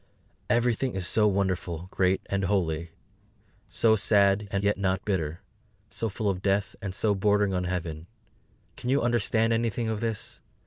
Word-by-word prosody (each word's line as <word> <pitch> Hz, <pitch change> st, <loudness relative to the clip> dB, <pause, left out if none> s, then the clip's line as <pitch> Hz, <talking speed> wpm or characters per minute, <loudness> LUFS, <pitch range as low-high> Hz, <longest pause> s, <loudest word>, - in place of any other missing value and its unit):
Everything 120 Hz, +1 st, +1 dB
is 95 Hz, -2 st, -2 dB
so 105 Hz, +5 st, +3 dB
wonderful, 95 Hz, -4 st, -1 dB
great 95 Hz, 0 st, +1 dB
and 100 Hz, 0 st, -1 dB
holy, 85 Hz, -4 st, 0 dB, 0.8 s
so 110 Hz, -1 st, +3 dB
sad 100 Hz, -1 st, +3 dB
and 100 Hz, 0 st, -1 dB
yet 100 Hz, 0 st, +2 dB
not 95 Hz, +1 st, 0 dB
bitter, 85 Hz, -6 st, -2 dB, 0.5 s
so 115 Hz, -, -2 dB
full 105 Hz, +1 st, -3 dB
of 95 Hz, -2 st, 0 dB
Death 100 Hz, 0 st, 0 dB
and 95 Hz, -2 st, -5 dB
so 105 Hz, 0 st, +1 dB
bordering 100 Hz, 0 st, +2 dB
on 90 Hz, 0 st, -1 dB
Heaven. 85 Hz, -3 st, -4 dB, 0.7 s
Can 125 Hz, -, -4 dB
you 140 Hz, 0 st, +2 dB
understand 115 Hz, -1 st, +2 dB
anything 115 Hz, 0 st, -1 dB
of 110 Hz, -1 st, -2 dB
this? 115 Hz, -1 st, -4 dB
100 Hz, 155 wpm, -27 LUFS, 95-110 Hz, 0.8 s, so